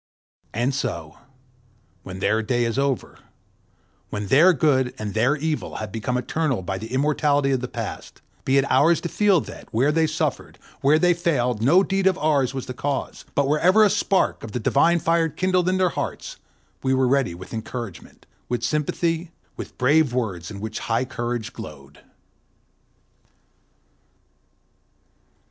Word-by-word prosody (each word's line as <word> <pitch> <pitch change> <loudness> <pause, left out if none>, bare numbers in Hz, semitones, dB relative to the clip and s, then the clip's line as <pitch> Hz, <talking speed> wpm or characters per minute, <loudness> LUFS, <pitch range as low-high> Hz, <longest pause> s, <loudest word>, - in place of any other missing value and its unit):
And 120 +5 0
so, 80 - -4 0.8
when 95 0 -8
their 110 +3 +2
day 120 +2 0
is 115 +3 -1
over, 140 -2 -2 0.9
when 105 -1 -4
their 165 - +6
good 130 -5 +1
and 105 -2 -5
their 120 +7 +2
evil 155 +1 -3
have 110 -3 -5
become 115 +4 -2
eternal 130 -3 -1
by 95 +1 -3
the 110 +1 -8
immortality 145 +1 +2
of 130 - +1
the 125 - -3
past, - - -7 0.2
be 135 +1 +2
it 135 - +3
ours 150 +6 +4
to 170 - -4
feel 200 -4 +3
that, - - -11
where 130 +7 +2
they 160 +1 +2
suffered, 155 - -3 0.2
where 145 +3 +4
they 175 +2 +4
failed, 125 -10 0
no 170 - +5
deed 195 0 +1
of 190 -1 +2
ours 145 -6 +1
was 130 -1 -5
the 125 - -6
cause; 140 +2 -4
but 140 -1 +2
wherever 180 +9 +4
a 205 - +4
spark 195 - +1
of 110 -2 -8
the 125 - -1
divine 155 +9 +3
fire 165 0 +1
kindled 185 +2 +1
in 185 - +1
their 185 -1 +3
hearts, - - -5 0.4
we 130 0 +1
were 130 -1 +2
ready 135 -9 +1
with 95 +5 -11
encouragement, 115 -3 -7 0.2
with 120 -2 -2
sympathy, 165 +3 -1 0.3
with - - -9
brave 140 0 +3
words 95 -9 -2
in 100 - -8
which 110 +1 -5
high 115 +2 -1
courage 120 -2 -4
glowed. 70 -2 -11
135 Hz, 160 wpm, -23 LUFS, 115-160 Hz, 0.9 s, their